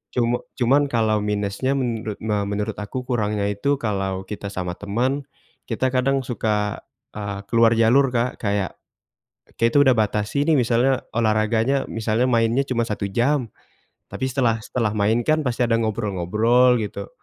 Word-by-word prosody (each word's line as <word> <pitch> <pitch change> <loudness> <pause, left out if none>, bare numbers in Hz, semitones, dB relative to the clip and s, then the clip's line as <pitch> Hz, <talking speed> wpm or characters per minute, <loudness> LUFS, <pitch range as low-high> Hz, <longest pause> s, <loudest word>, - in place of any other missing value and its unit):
Cum 120 0 +1 0.2
cuman 135 +4 +3
kalau 110 -4 +1
minusnya 105 +5 -1
menurut 115 -5 -2
me 105 -1 0
menurut 105 +1 -3
aku 105 +5 -5
kurangnya 105 -5 -1
itu 140 +8 0
kalau 95 -6 -2
kita 100 +1 -7
sama 95 -2 -4
teman, 130 +7 -1 0.4
kita 130 +2 -1
kadang 135 +1 +1
suka, 105 -4 -1 0.3
eee, 100 -1 -5
keluar 115 0 +5
jalur, 120 +5 +4
Kak. 125 0 -1
Kayak, 100 -3 -2 0.8
kita 115 +5 +3
udah 135 -3 +5
batasi 105 +5 0
nih 160 0 +3
misalnya 125 +2 +2
olahraganya, 115 +4 +1
misalnya 115 +2 0
mainnya 115 +2 +2
cuma 120 -2 0
1 105 -3 -3
jam. 120 +5 +1 0.6
Tapi - - -4
setelah 120 -4 +1
setelah 115 -4 -1
main 105 +3 +2
kan 155 0 +2
pasti 125 -1 -2
ada 115 -1 +2
ngobrol-ngobrol 110 +3 +2
gitu. 100 -2 -5
115 Hz, 145 wpm, -22 LUFS, 105-125 Hz, 0.8 s, keluar